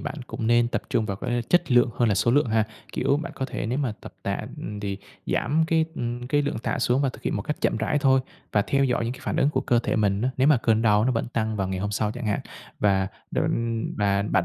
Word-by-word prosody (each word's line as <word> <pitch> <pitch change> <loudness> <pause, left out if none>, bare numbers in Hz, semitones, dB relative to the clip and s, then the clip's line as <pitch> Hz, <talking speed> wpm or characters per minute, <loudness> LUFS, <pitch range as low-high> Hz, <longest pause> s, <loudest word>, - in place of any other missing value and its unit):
bạn - - -4
cũng 110 - -4
nên 120 0 +4
tập - - -2
trung 110 - +1
vào 100 -2 -3
cái 120 +3 -1
chất 175 -5 +3
lượng 120 0 +5
hơn 120 -2 +3
là 100 - +3
số 110 +4 +2
lượng 140 +1 +4
ha. 110 0 +2 0.3
Kiểu 140 +2 +2
bạn 155 +1 -5
có 135 - -3
thể - - -4
nếu 125 +4 -1
mà 135 -6 0
tập - - -10
tạ, - - -1 0.2
ừm, 105 0 -6
thì 100 -1 -3 0.3
giảm 160 +3 +1
cái, 160 -1 +3
ừm, 120 +1 -3
cái 145 +3 +2
lượng 145 -4 -2
tạ 125 - -2
xuống 125 +2 +2
và 135 - +2
thực - - -9
hiện - - -1
một 100 - -2
cách 150 - -3
chậm - - +1
rãi 145 - 0
thôi, 135 -2 +4 0.3
và 105 - +3
theo 140 +4 +1
dõi 120 -2 +1
những 115 - -2
cái 130 - -11
phản - - -2
ứng 140 - +3
của 130 -3 0
cơ 120 - +2
thể 115 - -1
mình 100 0 +1
á, 130 - +1
nếu 130 +3 +4
mà 150 - +6
cơn 115 -1 +2
đau 105 -1 +4
nó 130 - +2
vẫn 115 - -1
tăng 110 -2 -1
vào 95 -2 -1
ngày 95 0 -2
hôm 100 +2 -2
sau 105 +1 0
chẳng 120 -2 -5
hạn. 105 - 0 0.4
Và 95 -2 +2 0.2
định 115 -1 0
và 100 -1 +2
bạn 95 -3 +1
120 Hz, 285 wpm, -25 LUFS, 105-130 Hz, 0.4 s, mà